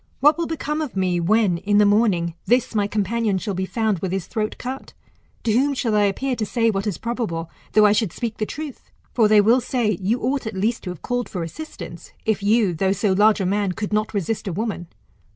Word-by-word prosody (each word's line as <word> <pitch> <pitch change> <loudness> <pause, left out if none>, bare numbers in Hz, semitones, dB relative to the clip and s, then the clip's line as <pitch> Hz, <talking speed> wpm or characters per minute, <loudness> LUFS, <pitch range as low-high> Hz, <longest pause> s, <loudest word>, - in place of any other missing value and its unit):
What 295 +3 +5
will 335 0 -2
become 310 -1 -2
of 295 -9 -4
me, 180 -2 +1
when, 190 0 +2
in 205 +2 +1
the 210 - +6
morning, 200 -5 +2
this 245 0 +2
my 205 -2 +1
companion 215 0 0
shall 200 +2 -3
be 190 +1 -2
found 220 -4 0
with 185 +1 -3
his 190 -2 -2
throat 215 -2 -3
cut? 260 +2 -6 0.5
To 225 - +1
whom 275 +5 +2
shall 230 -4 -1
I 205 -1 +4
appear 255 +7 -1
to 220 - -1
say 230 +1 +1
what 195 +1 -2
is 195 -6 -2
probable, 215 -9 -3 0.2
though 215 -1 +6
I 205 - +6
should 210 -3 +1
speak 230 +2 -4
the 215 - -2
truth? 295 -3 -7 0.2
For 225 -3 +4
they 210 -1 +6
will 235 +5 +4
say, 225 -7 0
you 215 +6 +1
ought 260 0 -1
at 220 - -5
least 220 +5 0
to - - -3
have 180 -3 -8
called 245 -1 -2
for 180 -3 -4
assistance, 310 - -9
if 220 -2 +1
you, 205 -2 +3
though 190 +4 +1
so 200 0 +1
large 210 +3 +4
a - - 0
man, 200 0 0
could 210 +2 -4
not 215 0 +1
resist 205 +2 -2
a 190 - -2
woman. 205 -3 -3
215 Hz, 235 wpm, -22 LUFS, 195-235 Hz, 0.5 s, the